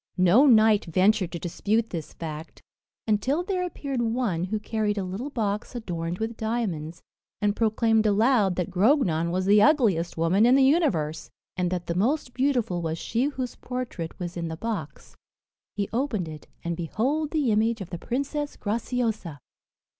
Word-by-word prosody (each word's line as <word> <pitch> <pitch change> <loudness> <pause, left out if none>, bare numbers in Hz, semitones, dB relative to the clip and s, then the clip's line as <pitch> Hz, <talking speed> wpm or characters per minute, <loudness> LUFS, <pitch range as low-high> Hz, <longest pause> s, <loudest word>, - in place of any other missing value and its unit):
No 185 +10 +5
knight 220 -4 +5
ventured 185 +2 +2
to - - -2
dispute 215 +6 -1
this 165 -4 -5
fact, 160 0 -8 0.4
until 260 +10 +1
there 370 -1 -1
appeared 280 -7 -3
one 225 -7 0
who 215 +3 -2
carried 210 -1 -1
a 200 - -1
little 195 +10 -5
box 210 -4 -3
adorned 175 -6 -4
with 225 +2 -3
diamonds, 195 -9 -3 0.4
and 205 -1 +1
proclaimed 225 0 +2
aloud 210 -2 +3
that 180 +1 -2
Grognon 185 - +2
was 185 +2 -1
the 205 +1 +5
ugliest 210 - +3
woman 165 +6 +3
in 250 - +6
the 270 - +5
universe, 265 - +1 0.3
and 180 -1 0
that 180 -1 -3
the 170 - -2
most 245 - 0
beautiful 250 -10 0
was 165 -1 -2
she 235 +9 -1
whose 260 -4 -3
portrait 250 -10 -5
was 175 -2 -5
in 170 -1 -3
the 160 0 -5
box. 200 -8 -5 0.6
He 200 -1 -1
opened 230 - -1
it, 155 -1 -9 0.2
and 170 0 -2
behold 255 - -1
the 295 -7 +1
image 225 +2 +2
of 190 -3 -8
the 175 - -5
Princess 280 - -3
Graciosa! 220 - -2
215 Hz, 165 wpm, -26 LUFS, 175-245 Hz, 0.6 s, in